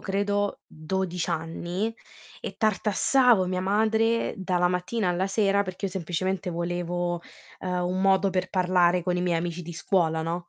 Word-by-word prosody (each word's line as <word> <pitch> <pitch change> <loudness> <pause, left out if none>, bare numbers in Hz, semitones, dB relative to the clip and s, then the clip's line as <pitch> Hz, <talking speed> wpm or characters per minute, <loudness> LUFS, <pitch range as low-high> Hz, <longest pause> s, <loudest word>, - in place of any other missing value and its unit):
credo 205 +1 -1
12 180 +2 -3
anni, 175 +6 -2 0.5
e - - -6
tartassavo 220 +1 +3
mia 185 0 -1
madre 220 +4 +1
dalla 180 -2 +1
mattina 180 +4 -1
alla 180 +2 0
sera 200 0 +2
perché 185 0 -6
io 195 - -1
semplicemente 185 +1 -2
volevo, 175 0 -2 0.4
ehm, 180 -1 -1
un 185 +1 -1
modo 195 0 +3
per 185 0 -1
parlare 180 -2 +3
con 180 -1 0
i - - 0
miei 175 -2 +1
amici 170 +1 -4
di 170 +1 -7
scuola, 160 -2 +1
no? 170 +2 -4
185 Hz, 155 wpm, -26 LUFS, 175-195 Hz, 0.5 s, tartassavo